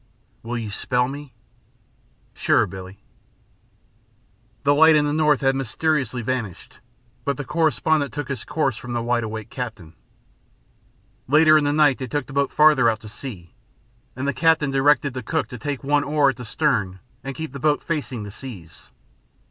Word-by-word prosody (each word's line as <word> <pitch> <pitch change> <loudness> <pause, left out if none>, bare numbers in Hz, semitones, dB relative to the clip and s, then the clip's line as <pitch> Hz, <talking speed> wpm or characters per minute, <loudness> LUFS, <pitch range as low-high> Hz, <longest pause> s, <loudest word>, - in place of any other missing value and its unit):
"Will 120 +1 -4
you 110 -3 -5
spell 125 +4 0
me?" 140 0 -8 1.0
"Sure, - - +2
Billie." 95 0 -9 1.7
The 145 +1 +4
light 160 +2 +6
in 150 -1 +3
the 145 - 0
north 150 -2 +3
had 135 0 +2
mysteriously 135 -1 -1
vanished, 110 -7 -4 0.4
but 140 -2 -1
the 145 - -5
correspondent 155 -1 +1
took 145 -2 -5
his 135 -5 -4
course 135 -8 -1
from 125 +1 -7
the 120 -1 -1
wide 120 0 0
awake 110 -1 -6
captain. 110 -10 -6 1.3
Later 155 +3 +6
in 150 -1 +4
the 145 - +2
night 145 -3 +3
they 130 - -4
took 145 +2 -2
the 135 - -11
boat 140 0 +1
farther 150 -6 +5
out 110 0 -2
to 110 - -10
sea, 105 -7 -9 0.6
and 130 +2 -3
the 140 - +1
captain 160 -3 +2
directed 140 0 +3
the 130 - -4
cook 110 - -2
to 125 -4 -8
take 145 +1 -4
one 145 +1 +2
oar 145 -1 +3
at - - -14
the 125 - -8
stern 105 -8 0 0.2
and 135 0 -5
keep 160 -4 -6
the 140 - -6
boat 150 +2 +1
facing 135 -8 -3
the 100 - -8
seas. 100 -9 -11
135 Hz, 175 wpm, -23 LUFS, 120-150 Hz, 1.7 s, light